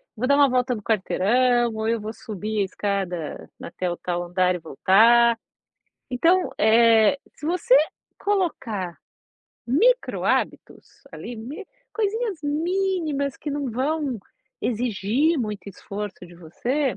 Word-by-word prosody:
vou 245 Hz, +4 st, -2 dB
dar 280 Hz, -, +5 dB
uma 285 Hz, -2 st, +5 dB
volta 250 Hz, 0 st, +1 dB
no 215 Hz, -, -7 dB
quarteirão 235 Hz, +3 st, +2 dB
ou 220 Hz, 0 st, -2 dB
eu 230 Hz, 0 st, +1 dB
vou 215 Hz, +1 st, -6 dB
subir 215 Hz, -1 st, -4 dB
a -, -, +2 dB
escada 190 Hz, -5 st, -3 dB
até 180 Hz, +1 st, -3 dB
o 175 Hz, -, -4 dB
tal 175 Hz, -1 st, -3 dB
andar 180 Hz, +1 st, +1 dB
e -, -, -5 dB
voltar, 230 Hz, -, +4 dB, 0.7 s
então, 335 Hz, +9 st, +2 dB
eh, 225 Hz, +1 st, +5 dB, 0.2 s
se -, -, -9 dB
você 330 Hz, -6 st, +3 dB, 0.4 s
colocar 235 Hz, -, -2 dB, 0.7 s
micro-hábitos 470 Hz, -, 0 dB
ali, 240 Hz, -, -8 dB
mi 280 Hz, -, -8 dB, 0.3 s
coisinhas 435 Hz, -4 st, -2 dB
mínimas 315 Hz, -2 st, -1 dB
que 300 Hz, -, -5 dB
não 285 Hz, -2 st, -3 dB
vão 270 Hz, 0 st, -1 dB, 0.4 s
exigir 245 Hz, -, 0 dB
muito 210 Hz, -4 st, -4 dB
esforço 200 Hz, -1 st, -7 dB
de 175 Hz, -, -15 dB
você, 245 Hz, -, -2 dB
235 Hz, 125 wpm, -24 LUFS, 205-290 Hz, 0.7 s, dar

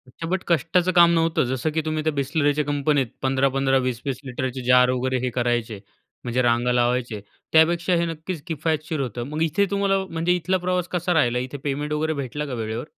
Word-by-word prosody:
अच्छा, 165 Hz, +6 st, -8 dB
बट 185 Hz, +2 st, -1 dB
कष्टाचं 170 Hz, +3 st, +2 dB
काम 170 Hz, -1 st, +6 dB
नव्हतं, 165 Hz, -1 st, +2 dB
जसं 130 Hz, +5 st, -1 dB
की 160 Hz, +1 st, 0 dB
तुम्ही 155 Hz, 0 st, -2 dB
त्या 155 Hz, 0 st, 0 dB
Bisleriच्या 145 Hz, +1 st, 0 dB
कंपनीत 145 Hz, -2 st, +1 dB
15-15, 135 Hz, 0 st, +2 dB
20-20 130 Hz, 0 st, -2 dB
लिटरचे 130 Hz, 0 st, -4 dB
जार 125 Hz, 0 st, +6 dB
वगैरे 130 Hz, +1 st, 0 dB
हे -, -, 0 dB
करायचे. 120 Hz, -3 st, -1 dB, 0.4 s
म्हणजे 125 Hz, +1 st, 0 dB
रांगा 120 Hz, 0 st, +2 dB
लावायचे, 120 Hz, -2 st, 0 dB, 0.3 s
त्यापेक्षा 170 Hz, +2 st, +4 dB
हे 170 Hz, -, +1 dB
नक्कीच 165 Hz, 0 st, -5 dB
किफायतशीर 155 Hz, 0 st, -2 dB
होतं. 120 Hz, -3 st, -3 dB
मग 150 Hz, +2 st, -4 dB
इथे 165 Hz, +5 st, +2 dB
तुम्हाला, 200 Hz, -1 st, +1 dB
म्हणजे 165 Hz, +2 st, 0 dB
इथला 185 Hz, +2 st, 0 dB
प्रवास 180 Hz, -1 st, -1 dB
कसा 180 Hz, 0 st, 0 dB
राहिला? 125 Hz, -7 st, +2 dB
इथे 130 Hz, +3 st, -5 dB
पेमेंट 145 Hz, +1 st, -2 dB
वगैरे 155 Hz, +1 st, 0 dB
भेटलं 140 Hz, +1 st, -4 dB
का 135 Hz, -, -5 dB
वेळेवर? 115 Hz, +1 st, -4 dB
145 Hz, 185 wpm, -23 LUFS, 125-165 Hz, 0.4 s, काम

